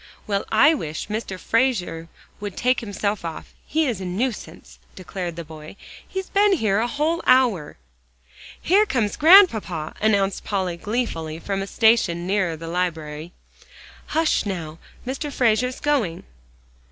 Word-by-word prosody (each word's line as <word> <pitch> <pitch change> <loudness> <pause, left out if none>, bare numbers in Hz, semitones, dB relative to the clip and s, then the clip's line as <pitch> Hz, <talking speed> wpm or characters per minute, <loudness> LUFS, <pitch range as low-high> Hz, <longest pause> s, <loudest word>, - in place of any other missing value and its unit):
"Well 200 -1 -1
I 220 +9 +6
wish 160 - -5
Mr. 210 -3 -4
Frazer 185 -8 0 0.3
would 205 -2 -6
take 255 +1 +2
himself 205 -3 -3
off; 165 -2 -7
he's 280 - 0
a - - -5
nuisance," 215 +7 -4 0.2
declared 180 -2 -6
the 170 - -6
boy. 155 +2 -11 0.3
"He's 380 0 -5
been 405 0 +3
here 215 - +1
a 235 - +1
whole 305 +6 -1
hour." 245 - +3 0.8
"Here 410 +5 +3
comes 225 - 0
Grandpapa!" 230 - +5
announced 200 -2 +1
Polly 185 -4 -2
gleefully, 185 -7 -3
from 195 +3 -3
a 195 - -4
station 205 -7 +2
nearer 185 -4 0
the 165 +1 -8
library. 165 -2 -3 0.8
"Hush, 320 0 +1
now, 170 -6 -5 0.3
Mr. 275 +3 -4
Frazer's 250 0 +1
going!" 245 - 0
205 Hz, 135 wpm, -23 LUFS, 170-255 Hz, 0.8 s, I